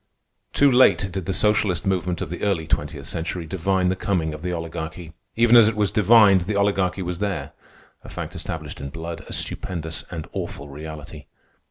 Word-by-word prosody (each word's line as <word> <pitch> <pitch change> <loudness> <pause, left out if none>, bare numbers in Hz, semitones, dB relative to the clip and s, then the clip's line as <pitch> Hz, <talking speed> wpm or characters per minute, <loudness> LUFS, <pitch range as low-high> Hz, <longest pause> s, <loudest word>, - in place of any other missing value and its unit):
Too 140 -1 +5
late 100 -7 +4
did 95 -2 -4
the - - 0
socialist 105 -1 +2
movement 90 -2 -1
of - - -7
the 90 - -5
early 95 -6 0
twentieth 80 - -2
century 85 +1 -3
divine 95 +2 0
the 95 - 0
coming 85 -5 -1
of 75 - -8
the 90 +1 -3
Oligarchy. 80 -1 -6 0.2
Even 120 +1 +5
as 115 -3 +8
it 110 - 0
was 105 -2 +1
divined, 105 -4 +5
the 105 - -1
Oligarchy 100 -2 +1
was 90 0 -4
there—a 100 -2 -7
fact - - -6
established - - -6
in 70 - -5
blood, 85 +3 -7
a - - -8
stupendous 80 -3 -2
and 80 -3 -6
awful 70 +1 -5
reality. 75 +1 -9
90 Hz, 180 wpm, -23 LUFS, 80-100 Hz, 0.2 s, as